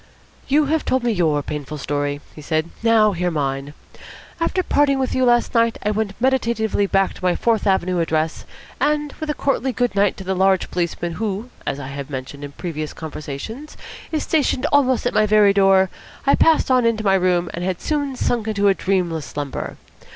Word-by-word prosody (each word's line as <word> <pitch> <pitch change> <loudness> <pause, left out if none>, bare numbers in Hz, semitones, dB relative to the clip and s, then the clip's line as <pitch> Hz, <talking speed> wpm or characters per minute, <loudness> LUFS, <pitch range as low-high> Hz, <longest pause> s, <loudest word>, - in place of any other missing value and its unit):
"You 295 +2 +3
have 310 +2 0
told 260 -1 0
me 240 - +1
your 160 -7 +1
painful 150 +1 -5
story," 145 0 -2
he 155 - -11
said. 155 +2 -1
"Now 225 -2 +4
hear 180 -1 -1
mine. 140 -2 -3 0.6
After 365 +2 0
parting 285 -4 +2
with 265 -1 -1
you 255 - +2
last 240 -1 +3
night, 230 -1 +2
I 210 - +2
went 210 -1 -3
meditatively 230 -5 +1
back 195 0 +1
to - - -14
my 180 -1 +2
Fourth 225 -3 +1
Avenue 185 -2 +1
address, 160 -1 -1 0.3
and, 295 -1 0
with 310 - -4
a 300 - 0
courtly 270 -1 0
good 245 -1 0
night 200 -1 +2
to 190 - -7
the 190 +1 -1
large 190 0 +2
policeman 175 -1 -2
who, 220 +3 -3 0.2
as 140 - -2
I 135 -1 -6
have 140 0 -6
mentioned 135 +1 -6
in 140 0 -7
previous 155 -2 -5
conversations, 160 - -7 0.3
is 310 -2 -1
stationed 290 -4 +1
almost 260 -4 +3
at 245 - 0
my 215 0 +3
very 210 -1 +5
door, 195 -1 +4 0.3
I 275 - +4
passed 320 -4 +3
on 255 -1 +4
into 230 -2 +1
my 195 -2 +3
room, 180 -2 +1
and 175 - -4
had 185 -1 -2
soon 285 -3 -2
sunk 235 -3 -1
into 205 -2 +2
a - - +5
dreamless 175 -6 -1
slumber. 145 -2 -5
195 Hz, 195 wpm, -21 LUFS, 165-245 Hz, 0.6 s, very